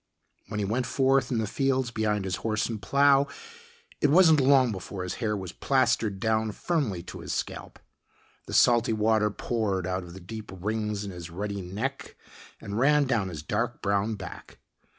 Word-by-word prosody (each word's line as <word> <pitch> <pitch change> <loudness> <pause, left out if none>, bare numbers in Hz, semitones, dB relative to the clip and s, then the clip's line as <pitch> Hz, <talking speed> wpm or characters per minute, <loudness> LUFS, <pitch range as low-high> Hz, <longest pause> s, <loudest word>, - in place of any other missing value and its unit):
When 105 - -5
he 100 - 0
went 120 +5 -1
forth 135 0 +2
in 125 - 0
the 110 - 0
fields 130 +1 0
behind 105 -3 0
his 90 -1 -2
horse 110 -1 -1
and 110 -3 -5
plow, 140 +1 +4 0.7
it - - +4
wasn't 160 -2 +6
long 130 -2 +5
before 95 -1 -6
his 90 - -3
hair 105 -2 0
was 95 -3 -6
plastered 115 -7 +1
down 110 -1 0
firmly 125 - -1
to - - -9
his - - -5
scalp. - - -5 0.7
The - - -7
salty 120 -2 +4
water 110 0 +2
poured 105 -4 -2
out 95 +1 -2
of 90 -1 -11
the - - -8
deep 110 +4 -8
rings 105 +1 -2
in 100 - -5
his 90 -2 -8
ruddy 100 +3 -4
neck 110 +10 -5 0.4
and 100 +2 -4
ran 145 +2 +4
down 115 -7 0
his 80 -4 -7
dark 115 +7 -2
brown 100 +2 +1
back. 95 -3 -10
110 Hz, 180 wpm, -27 LUFS, 100-130 Hz, 0.7 s, wasn't